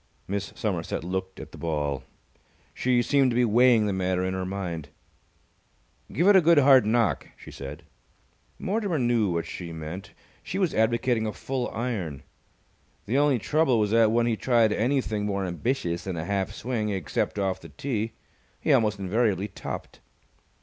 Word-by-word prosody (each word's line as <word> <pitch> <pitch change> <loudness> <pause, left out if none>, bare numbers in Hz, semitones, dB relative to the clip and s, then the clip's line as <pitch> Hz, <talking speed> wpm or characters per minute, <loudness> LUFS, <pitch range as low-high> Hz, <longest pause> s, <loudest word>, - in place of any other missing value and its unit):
Miss 100 +1 -3
Somerset - - -2
looked 95 +1 -4
at - - -9
the - - -12
ball. 75 -4 -2 0.7
She 125 -1 +2
seemed 135 +1 +3
to 120 - -1
be 125 0 +4
weighing 120 0 +5
the 100 - 0
matter 95 -1 0
in 95 - -1
her 95 0 -3
mind. 85 -6 -4 1.2
"Give 170 +5 +1
it 205 - +7
a 190 - +8
good 170 0 +5
hard 135 -5 +6
knock," 115 -2 +1
she - - -12
said. 70 0 -8 0.7
Mortimer 200 -4 -1
knew 120 -5 +2
what 85 -1 -1
she 85 -2 -7
meant. 85 +6 -7 0.3
She 180 - -5
was 185 -4 +1
advocating 115 0 +1
a - - -2
full 130 +2 -3
iron. 100 - -4 0.8
The 120 +7 +1
only 145 -3 +3
trouble 140 +2 +2
was 105 -1 +1
that, 115 -1 +5
when 115 +1 +2
he 115 -1 +1
tried 115 -2 +3
anything 110 -4 0
more 100 -1 -1
ambitious 90 -1 -2
than 95 -3 -3
a 80 - -3
half 100 -1 -1
swing, 110 -2 -2
except 95 0 -2
off 95 -2 -1
the - - -11
tee, 115 -5 -3 0.5
he - - +2
almost 105 -2 +3
invariably 100 0 0
topped. 100 - -7
110 Hz, 170 wpm, -26 LUFS, 95-125 Hz, 1.2 s, a